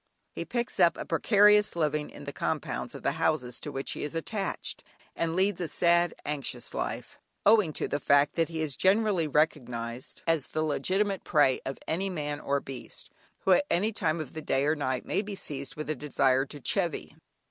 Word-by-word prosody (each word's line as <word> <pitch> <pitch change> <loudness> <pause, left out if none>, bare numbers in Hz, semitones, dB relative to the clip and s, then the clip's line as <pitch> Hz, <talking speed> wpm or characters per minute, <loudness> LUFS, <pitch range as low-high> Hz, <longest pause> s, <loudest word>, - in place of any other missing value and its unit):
He - - -5
picks 240 -1 -3
up 170 - +5
a - - -5
precarious 210 +4 +4
living 150 -2 0
in - - -11
the - - -6
compounds - - -3
of - - -9
the - - +2
houses 125 -6 0
to - - -6
which 135 0 -3
he - - -4
is 150 +2 -4
attached, 195 +4 -3 0.3
and 165 0 -1
leads 190 0 +1
a 175 - -1
sad, 170 +2 +3
anxious 145 -3 -3
life, - - -4 0.3
owing 210 -6 +5
to - - -2
the 145 - -1
fact 140 0 +4
that 165 -1 +1
he 160 -1 -3
is 145 -4 0
generally 195 -4 +3
recognised 125 -6 -1
as 165 -4 +1
the 155 - -2
legitimate 190 +6 0
prey 145 -5 +3
of 135 - -4
any 190 +5 -1
man 150 -4 -3
or 140 -1 0
beast, 135 -2 -9 0.3
who 195 - +2
at 240 +10 +5
any 205 +6 +2
time 170 -6 0
of 155 -4 -6
the 155 - -5
day 135 -2 +1
or 155 +2 +2
night 130 -4 -2
may - - 0
be 210 -1 -6
seized 140 -7 -5
with 155 - -5
a 155 - 0
desire 135 -1 +1
to 145 - -9
"chivy." 170 +5 -1
155 Hz, 200 wpm, -29 LUFS, 140-185 Hz, 0.3 s, up